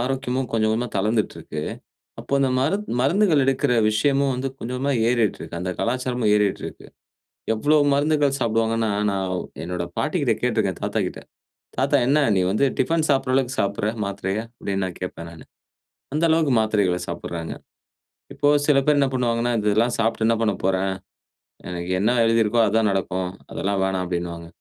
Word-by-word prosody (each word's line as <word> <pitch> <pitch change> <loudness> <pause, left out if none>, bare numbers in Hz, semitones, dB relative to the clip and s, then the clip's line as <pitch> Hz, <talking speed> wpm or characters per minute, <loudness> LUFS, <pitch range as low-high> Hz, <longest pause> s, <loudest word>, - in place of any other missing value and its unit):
ஆரோக்கியமும் 130 0 -2
கொஞ்சம் 110 -1 +2
கொஞ்சமா 120 +3 -1
தளர்ந்துட்டு 105 +2 0
இருக்கு. 75 0 -6 0.6
அப்போ - - -10
அந்த 135 -1 +2
மருந்து 195 - -1
மருந்துகள் 160 +2 +3
எடுக்கிற 135 0 +1 0.2
விஷயமும் 135 +5 +2
வந்து 130 +2 -2
கொஞ்ச 115 - -6
கொஞ்சமா 140 +2 0 0.2
ஏறிட்டு 120 -4 +1
இருக்கு, 85 - -6
அந்த 90 0 -2
கலாச்சாரமும் 125 -2 0
ஏறிட்டு 105 -2 +1
இருக்கு. - - -9 0.7
எவ்வளோ 145 +8 +2 0.2
மருந்துகள் 145 -1 +2
சாப்டுவாங்கன்னா, 115 -1 +1 0.2
நான் 95 -1 -2 0.3
என்னோட 90 +1 -3
பாட்டிக்கிட்ட - - +1
கேட்டுருக்கேன், 110 -7 0
தாத்தா - - -1
கிட்ட. - - -8 0.6
"தாத்தா, - - +3
என்ன 145 +3 +4 0.2
நீ 95 - +3
வந்து 110 +8 +2
டிஃபன் 160 +4 +2
சாப்படுற 135 -2 +2
அளவுக்கு 130 -1 0
சாப்புடுற, 100 +1 0 0.2
மாத்திரைய?" 100 0 -3 0.2
அப்டின்னு 100 -3 -2
நான் 90 - -6
கேட்பேன் 85 -2 -6
நானு. 80 - -13 0.7
அந்த 155 +3 0
அளவுக்கு 160 -4 +3
மாத்திரைகள 105 -5 +1
சாப்புடுறாங்க. 85 -1 -5 0.8
இப்போ 145 - +1 0.2
சில 145 -2 +4
பேர் 150 -1 +4
என்ன 140 -1 +3
பண்ணுவாங்கன்னா, 120 -1 0
"இதெல்லாம் 110 +3 +2
சாப்ட்டு 115 0 +1
என்ன 115 - +4
பண்ண 110 -2 +2
போறேன்? 95 0 +1 0.7
எனக்கு 90 0 -5
என்ன 105 +4 +2
எழுதி 115 0 +3
இருக்கோ 115 +3 +1
அதுதான் 110 0 +2
நடக்கும். 95 -1 -2 0.2
அதெல்லாம் 100 0 -1
வேணாம்" 95 -1 -1
அப்டின்வாங்க. 85 -1 -4
115 Hz, 160 wpm, -23 LUFS, 95-135 Hz, 0.8 s, என்ன